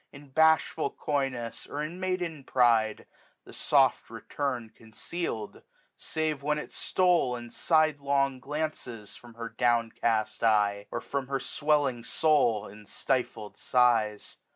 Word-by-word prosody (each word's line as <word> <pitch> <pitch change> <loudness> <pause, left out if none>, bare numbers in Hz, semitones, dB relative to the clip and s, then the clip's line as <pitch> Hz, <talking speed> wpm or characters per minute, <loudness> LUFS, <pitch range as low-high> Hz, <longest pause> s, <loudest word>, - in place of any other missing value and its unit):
In 140 0 -14
bashful 160 0 +3
coyness, 135 -5 -3
or 145 +1 -4
in 165 +4 -6
maiden 180 -5 -2
pride, 115 -5 +2 0.4
The - - -14
soft - - +2
return 125 -6 -4
conceal'd; 115 +1 -6 0.3
save 155 -2 -2
when 150 +1 0
it 150 - -6
stole 175 -9 +2
In 120 -1 -8
side 155 +1 +2
long 140 -1 +1
glances 135 -6 -5
from 120 -2 -15
her 115 0 -6
downcast 115 -3 0
eye. 105 -2 +2
Or - - -4
from 140 -2 -4
her 135 0 -1
swelling 145 -6 0
soul 125 -9 +2
in 105 +1 -14
stifled 120 -5 -2
sighs. 115 -4 +1
130 Hz, 130 wpm, -28 LUFS, 115-150 Hz, 0.4 s, bashful